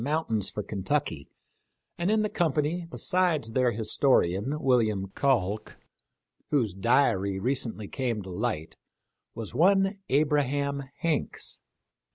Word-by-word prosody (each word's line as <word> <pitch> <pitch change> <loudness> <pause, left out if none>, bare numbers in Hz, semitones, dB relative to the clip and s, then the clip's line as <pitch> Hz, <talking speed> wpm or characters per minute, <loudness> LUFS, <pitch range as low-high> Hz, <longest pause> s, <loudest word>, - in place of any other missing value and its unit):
mountains 140 -8 0
for 105 - -4
Kentucky, 100 - -2 0.7
and 175 +2 -1
in 215 0 +3
the - - +1
company, 165 0 0
besides 175 -13 0
their 125 0 +2
historian, 110 - +1
William 110 -8 +2
Calk, 110 -4 0 0.4
— - - -47
whose 120 - +1
diary 100 -2 +2
recently 115 -3 -2
came 120 -5 -2
to 95 - -8
light, 90 -5 -3 0.3
— - - -54
was 115 -2 -6
one 195 - +3
Abraham 140 -1 +1 0.2
Hanks. 165 -4 -1
130 Hz, 120 wpm, -28 LUFS, 105-150 Hz, 0.7 s, in